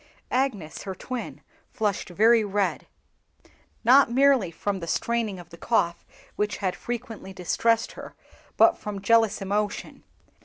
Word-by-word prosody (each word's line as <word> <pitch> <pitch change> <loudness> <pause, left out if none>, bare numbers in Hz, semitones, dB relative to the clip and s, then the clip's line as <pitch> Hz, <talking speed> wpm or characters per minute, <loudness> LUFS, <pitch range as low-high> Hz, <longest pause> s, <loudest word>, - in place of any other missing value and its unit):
Agnes, 240 - -1
her 190 -1 -6
twin, 250 +6 -6 0.3
flushed 205 -4 -2
very 220 +5 +4
red, 205 -1 -1 1.0
not 260 +3 +6
merely 260 -5 +4
from 195 +4 -3
the 170 - -7
straining 230 0 -1
of 175 -1 -12
the 170 - -11
cough 170 0 0 0.3
which 210 0 -1
had 185 -3 -2
frequently 230 -5 -6
distressed 225 +5 +1
her, - - -10 0.4
but - - +5
from 205 -1 -5
jealous 225 -2 +3
emotion. 205 +1 -3
210 Hz, 130 wpm, -25 LUFS, 190-235 Hz, 1.0 s, not